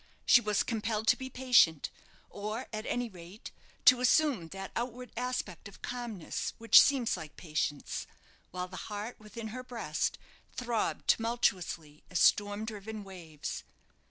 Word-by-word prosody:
She 240 - +7
was 210 -2 +1
compelled 220 -1 -2
to - - +7
be 260 0 -6
patient, 245 - +4 0.4
or, 215 +4 -4
at 215 +1 -4
any 245 0 -1
rate, 185 0 -11 0.3
to 255 -1 +8
assume 255 - +3
that 195 +3 -7
outward 250 +1 -4
aspect 250 -2 -3
of 200 - -15
calmness 235 -8 -4
which 230 -2 +8
seems 265 -5 +2
like 160 -4 -9
patience, 155 -3 -2 0.4
while 180 0 -4
the 185 0 -9
heart 210 +3 -5
within 220 +1 -7
her 255 +4 -5
breast 225 -12 -2 0.4
throbbed 240 -3 -1
tumultuously 180 -10 0
as 180 - -1
storm 205 +1 +3
driven 215 -1 -6
waves. 170 -6 -7
215 Hz, 140 wpm, -31 LUFS, 185-240 Hz, 0.4 s, to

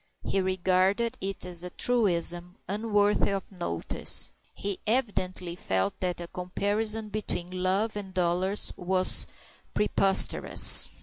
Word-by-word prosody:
He 195 - -1
regarded 190 +4 0
it 195 -1 -4
as 175 -1 -4
a 180 - -6
truism 180 -6 +1
unworthy 205 0 +1
of 195 0 -4
notice; 170 - 0 0.2
he 200 -2 -5
evidently 185 -7 -2
felt 95 - -2
that 180 -2 -3
a 170 - -7
comparison 210 +5 -2
between 185 -3 -5
love 195 +4 0
and 200 -2 -6
dollars 185 +2 +1
was 185 0 +2 0.5
preposterous. 195 -2 +5
190 Hz, 115 wpm, -27 LUFS, 180-205 Hz, 0.5 s, preposterous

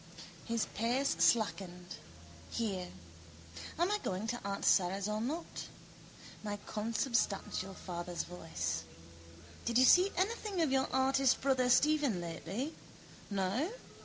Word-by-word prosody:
His 230 -1 0
pace 250 +5 +1
slackened. 180 -5 +1 0.5
Here. 195 -6 -2 0.9
Am 345 +4 +2
I 420 - +1
going 190 - -3
to 240 - -2
aunt 200 0 -3
Sara's 195 +2 +3
or 215 0 -1
not? 310 +8 -4 0.8
My 205 -1 -3
consubstantial 215 -3 -1
father's 175 -1 -4
voice. 85 - -3 0.8
Did 235 0 +1
you 255 - +7
see 365 +8 +6
anything 405 0 -1
of 300 - +1
your 265 0 +2
artist 265 0 +3
brother 260 -2 +2
Stephen 290 -6 +4
lately? 180 - -4 0.6
No? 200 - 0
230 Hz, 115 wpm, -34 LUFS, 190-270 Hz, 0.9 s, you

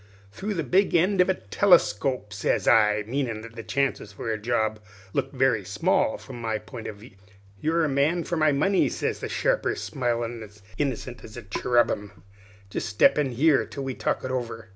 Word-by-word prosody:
"'Through 200 - -4
the 165 - -1
big 185 +9 +2
end 180 +3 +4
of 180 - +2
a 190 - +3
telescope,' 130 - +2
sez 100 - 0
I 105 -2 +4
meanin' 120 -2 -2
that 115 0 -11
the 115 - -6
chances 130 -2 -1
for 110 +3 -4
a - - -2
job 110 -2 0 0.3
looked 135 +1 -2
very 130 -5 +2
small 100 +3 +1
from 120 - -10
my 110 -1 -1
pint 110 +2 -9
of - - -6
view. 105 +4 -14 0.5
"'You're 165 +5 +1
the - - +2
man 145 +5 +1
for 175 - -3
my 155 -2 +3
money,' 185 +8 +2
sez - - -2
the - - -5
sharper, - - 0
smilin' 120 -3 -2
as 105 -1 -13 0.2
innocent 130 -3 -3
as 110 - -11
a 120 - -7
cherubim; 105 -3 0 0.5
'jest 115 - -3
step 105 +7 +4
in 135 -4 0
here, 140 +3 +4
till 140 - -7
we 135 -1 -3
talk - - -2
it 130 - -3
over.' 115 -3 -4
120 Hz, 195 wpm, -26 LUFS, 110-145 Hz, 0.5 s, end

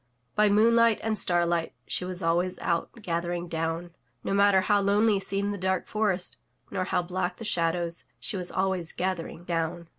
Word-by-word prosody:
By 210 0 +4
moonlight 230 +2 +5
and 220 -1 0
starlight 175 -3 +1
she 180 - -1
was 185 0 -5
always 175 +2 +1
out 170 -1 -1
gathering 175 0 -2
down. 165 +1 -3 0.3
No - - -1
matter 200 -1 +5
how 205 +2 +3
lonely 205 +1 +3
seemed 200 +1 -1
the 200 - -6
dark 190 0 0
forest, 205 -4 -1 0.3
nor 185 -2 -1
how 180 - 0
black 180 0 -2
the 225 - -7
shadows, 170 -2 0
she - - -3
was 180 -2 -3
always 185 -3 -1
gathering 180 -2 -3
down. 170 0 -2
185 Hz, 170 wpm, -27 LUFS, 170-200 Hz, 0.3 s, moonlight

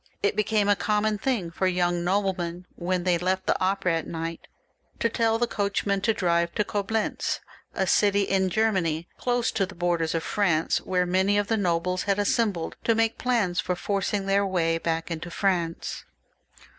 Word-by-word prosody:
It 200 - +2
became 215 -1 +1
a 205 - +5
common 210 +1 0
thing 205 -9 -1
for 185 +3 0
young 175 -1 +1
noblemen, 180 -2 -1
when 180 0 -1
they 175 -2 +2
^ - - -12
left 185 +1 0
the - - +2
opera 185 -3 +1
at - - -8
night, 165 0 -5 0.5
to 230 - +1
tell 225 0 +1
the 240 - +2
coachman 200 -2 -1
to 225 - +2
drive 170 -4 0
to 210 - +2
Coblentz, 210 +2 -1 0.4
a - - +1
city 200 -1 +3
in 190 -1 +1
Germany, 180 -6 0
close 245 -1 +1
to 195 -3 0
the 190 - -11
borders 170 -2 0
of 165 - -1
France, 165 -6 +1
where 180 -1 0
many 190 +3 +2
of 205 0 0
the 225 - +3
nobles 180 -2 0
had 200 - +3
assembled 205 -4 0
to 230 - +3
make 225 0 +1
plans 220 -8 +1
for 180 - 0
forcing 200 +1 -1
then* 195 +1 +2
way 165 -3 +1
back 165 0 -2
into 165 +1 -4
France. 170 -2 -1
190 Hz, 180 wpm, -26 LUFS, 175-205 Hz, 0.5 s, a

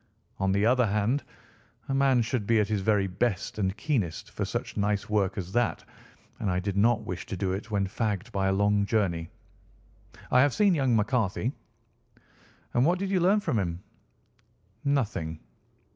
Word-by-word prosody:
On 95 0 +1
the 100 +2 +2
other 125 0 +4
hand, 105 +7 0 0.6
a 135 - -2
man 135 -3 +3
should 115 -3 -2
be 115 -1 +4
at 105 - +2
his 105 -2 0
very 100 0 +2
best 95 +2 -2
and 95 0 0
keenest 105 - -2
for - - -3
such - - -4
nice 105 -1 0
work 100 -2 +1
as 95 -2 -4
that, 120 +3 0 0.6
and 100 - -1
I 90 0 +1
did 95 +1 -3
not 110 +2 +3
wish 90 +4 -5
to 100 -7 -4
do 95 0 -1
it 100 +5 -4
when 100 -2 0
fagged 105 +1 -2
by 95 -2 0
a - - +2
long 100 +1 +2
journey. 85 -7 0 1.0
I 125 - +6
have 145 -1 +3
seen 205 -3 +4
young 135 -7 +2
McCarthy." 110 +1 0 1.2
"And 120 - +3
what 175 +5 +3
did 195 +1 -3
you 190 - +3
learn 195 +4 +3
from 150 - 0
him?" 85 -2 -3 1.0
"Nothing." 105 - -1
105 Hz, 175 wpm, -28 LUFS, 95-125 Hz, 1.2 s, I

